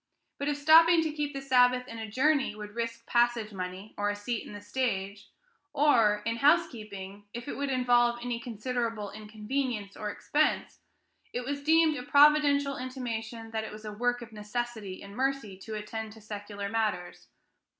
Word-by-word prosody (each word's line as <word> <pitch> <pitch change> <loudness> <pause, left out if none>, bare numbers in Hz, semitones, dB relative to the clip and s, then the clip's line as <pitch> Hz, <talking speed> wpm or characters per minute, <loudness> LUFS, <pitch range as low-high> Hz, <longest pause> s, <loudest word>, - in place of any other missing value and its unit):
But 280 - -2
if 295 -1 0
stopping 325 +3 +7
to 315 - -1
keep 295 -1 -2
the 275 -1 -6
Sabbath 250 -1 +4
in 230 -2 -8
a 220 -1 -5
journey 265 +1 +2
would 210 -1 -8
risk 230 0 -4
passage 235 -3 +1
money 185 +2 -6
or 205 0 +1
a 205 - -1
seat 215 +3 -4
in - - -9
the 205 - -7
stage, 205 -3 -3 0.4
or, 230 -8 +4
in 230 0 -1
housekeeping, 215 - 0
if 240 +2 -6
it - - -4
would 280 0 -2
involve 245 -2 +3
any 240 -1 -3
considerable 230 -2 -3
inconvenience 215 0 -4
or 210 - -4
expense, 295 +8 0 0.5
it 245 0 -3
was 285 +1 -3
deemed 320 0 +4
a - - -4
providential 285 0 +4
intimation 230 -3 -5
that 220 -1 -2
it 220 - -6
was 215 +1 -10
"a 210 - -5
work 245 +2 0
of 235 - -12
necessity 215 -2 -5
and 200 0 -11
mercy" 265 -5 -1
to 215 +2 -7
attend 215 +1 -5
to 220 - -14
secular 205 -1 -6
matters. 210 -5 -2
235 Hz, 175 wpm, -29 LUFS, 210-270 Hz, 0.5 s, stopping